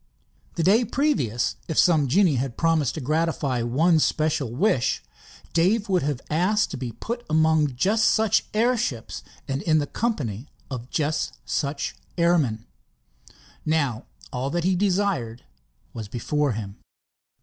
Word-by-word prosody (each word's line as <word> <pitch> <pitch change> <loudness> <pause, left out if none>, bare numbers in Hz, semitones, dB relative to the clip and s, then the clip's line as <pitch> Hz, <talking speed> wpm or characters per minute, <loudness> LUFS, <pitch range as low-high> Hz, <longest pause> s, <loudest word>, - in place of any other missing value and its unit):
The 165 - 0
day 210 +7 +5
previous, 230 - 0
if 160 - -3
some 155 -5 +4
genii 175 +4 +4
had 125 -1 -3
promised 165 -5 +1
to 155 - -4
gratify 150 -3 0
one 155 +8 +3
special 150 -5 0
wish, 130 - +1 0.5
Dave 200 +6 +2
would 185 -2 +2
have 140 -2 -2
asked 185 +8 +1
to - - -4
be 125 -3 -5
put 240 +1 -5
among 155 -3 +3
just 210 - +2
such 220 -1 +2
airships 225 - 0 0.3
and 135 +1 -2
in 155 -1 +2
the 145 - +1
company 145 - -3 0.2
of 125 -1 -6
just 155 +1 -1
such 140 -1 -2 0.2
airmen. 155 -11 +2 1.0
Now 140 -7 0 0.3
all 130 +2 -2
that 170 +3 -1
he 185 - +2
had 180 - 0
desired 185 - 0 0.5
was 110 -3 -6
before 140 +5 -1
him. 105 -2 -6
155 Hz, 140 wpm, -24 LUFS, 125-185 Hz, 1.0 s, day